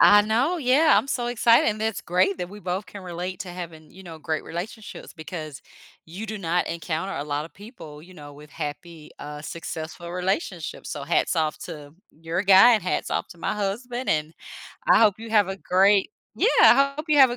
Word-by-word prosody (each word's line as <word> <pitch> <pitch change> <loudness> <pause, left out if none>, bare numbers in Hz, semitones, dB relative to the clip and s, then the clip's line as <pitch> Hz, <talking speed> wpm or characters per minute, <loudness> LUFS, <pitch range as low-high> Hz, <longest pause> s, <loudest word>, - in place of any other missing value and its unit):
I 205 0 +8
know, 240 +11 +1
yeah, 295 +2 +4
I'm - - -2
so 245 -3 -2
excited, 235 -1 +4
and 215 0 -2
that's 220 -3 -1
great 185 +3 +1
that 180 -1 -4
we 205 - -11
both 190 0 -4
can 200 - -10
relate 180 +1 -5
to 185 - -6
having, 165 -3 -9
you 190 - -14
know, 165 -3 -10
great 155 0 -3
relationships 210 +6 -8
because 155 -3 -8 0.4
you 190 +7 -7
do 215 0 -5
not 175 -1 0
encounter 165 +3 -3
a - - -3
lotta 150 +2 -4
people, 190 - -12
you 185 +3 -15
know, 145 -3 -11
with 150 +1 -14
happy, 155 +1 -7
uh, 150 0 -7
successful 165 +1 -7
relationships, 180 - -3
so 140 -1 -5
hats 170 - +1
off 155 -1 0
to 145 -1 -9 0.2
your 165 +4 -3
guy 195 +5 +7
and 215 - 0
hats 180 - -2
off - - -2
to 175 - -14
my 165 - -2
husband, 240 +5 -3
and 155 +1 0 0.6
I - - +7
hope 215 -3 +4
you 225 0 -9
have 210 -3 +4
a 195 - -4
great, 195 +2 +3 0.2
yeah, - - +2
I 275 +2 +6
hope 305 - -4
you 300 -1 +4
have 265 -2 +8
a 240 - -3
185 Hz, 205 wpm, -24 LUFS, 160-215 Hz, 0.6 s, I